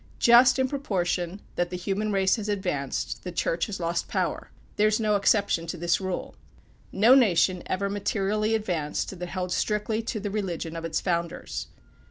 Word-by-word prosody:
Just 245 Hz, +2 st, +6 dB
in 260 Hz, 0 st, +2 dB
proportion 190 Hz, -, -2 dB, 0.2 s
that 175 Hz, 0 st, 0 dB
the 180 Hz, -, -4 dB
human 200 Hz, +4 st, -2 dB
race 190 Hz, +2 st, +2 dB
has 215 Hz, -1 st, -4 dB
advanced, 180 Hz, -10 st, -2 dB
the 180 Hz, -, -5 dB
Church 170 Hz, 0 st, -1 dB
has 205 Hz, -3 st, -5 dB
lost 170 Hz, 0 st, -1 dB
power. -, -, -2 dB, 0.3 s
There 210 Hz, -, +4 dB
is 215 Hz, +1 st, +1 dB
no 215 Hz, -2 st, +2 dB
exception 200 Hz, -4 st, +2 dB
to 170 Hz, -, -4 dB
this 170 Hz, +3 st, +1 dB
rule. 185 Hz, -1 st, -4 dB, 0.6 s
No 220 Hz, +6 st, +5 dB
nation 185 Hz, -7 st, +4 dB
ever 200 Hz, +2 st, -1 dB
materially 205 Hz, +2 st, 0 dB
advanced 180 Hz, -3 st, -2 dB
that 180 Hz, 0 st, -5 dB
held 180 Hz, -1 st, -3 dB
strictly 210 Hz, +3 st, 0 dB
to 225 Hz, -1 st, -4 dB
the 205 Hz, 0 st, -4 dB
religion 175 Hz, -5 st, -3 dB
of 165 Hz, 0 st, -5 dB
its 160 Hz, -1 st, -1 dB
founders. 170 Hz, -2 st, -3 dB
195 Hz, 175 wpm, -26 LUFS, 175-215 Hz, 0.6 s, Just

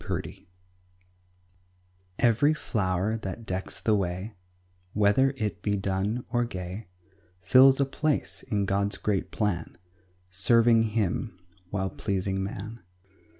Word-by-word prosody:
GOD'S -, -, -12 dB
ORDER -, -, -2 dB, 1.9 s
Every 120 Hz, +6 st, +4 dB
flower 100 Hz, -4 st, -1 dB
that 110 Hz, +1 st, -6 dB
decks 95 Hz, -1 st, -4 dB
the 110 Hz, -, +1 dB
way, 95 Hz, +2 st, -2 dB, 0.6 s
Whether 125 Hz, +7 st, +3 dB
it 105 Hz, -4 st, -3 dB
be 105 Hz, -1 st, 0 dB
dun 100 Hz, +4 st, -1 dB
or 120 Hz, -1 st, +2 dB
gay, 95 Hz, -2 st, -6 dB, 0.6 s
Fills 130 Hz, +7 st, +7 dB
a 140 Hz, -, +4 dB
place 150 Hz, +2 st, -1 dB
in 100 Hz, -2 st, -1 dB
God's 100 Hz, +1 st, 0 dB
great 100 Hz, -3 st, -1 dB
plan, 100 Hz, -7 st, -2 dB, 0.5 s
Serving 115 Hz, +4 st, +4 dB, 0.2 s
Him, 100 Hz, 0 st, -1 dB, 0.3 s
while 95 Hz, -1 st, -2 dB
pleasing 95 Hz, -1 st, -2 dB
man. 105 Hz, +4 st, -6 dB
105 Hz, 115 wpm, -27 LUFS, 95-115 Hz, 1.9 s, Fills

